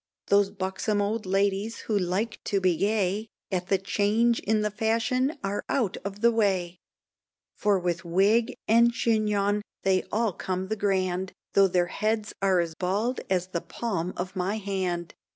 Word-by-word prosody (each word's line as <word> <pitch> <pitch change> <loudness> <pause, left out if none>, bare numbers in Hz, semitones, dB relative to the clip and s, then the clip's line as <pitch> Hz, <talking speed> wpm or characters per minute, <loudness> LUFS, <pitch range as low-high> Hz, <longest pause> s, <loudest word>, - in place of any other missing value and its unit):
Those 200 0 +4
buxon 195 +2 -2
old 210 0 -1
ladies 200 +3 0
who 220 - -2
like 200 +4 -1
to 200 - +1
be 185 -2 +2
gay, 205 +2 0 0.2
At 180 -1 -1
the 195 - +3
change 215 +5 +2
in 215 +1 +1
the 210 0 0
fashions 230 +6 +1
are 195 +1 -2
out 235 -9 0
of 200 +1 -7
the 235 0 +5
way, 190 -6 0 0.7
For 205 -1 +2
with 175 0 -2
wig 200 +7 +2
and 235 +2 +5
chignon 210 -3 +1 0.2
they 190 -1 +3
all 220 -2 +1
come 185 +2 -3
the 220 - 0
grand, 190 -2 0 0.2
Tho' 195 -1 +6
their 180 -1 +2
heads 215 +3 -1
are 190 -2 +3
as 170 -2 -1
bald 200 +9 -1
as 185 -1 0
the 170 -2 -2
palm 185 -7 -3
of 180 +2 -4
my 190 +3 -1
hand. 185 -4 -2
200 Hz, 165 wpm, -27 LUFS, 185-215 Hz, 0.7 s, Tho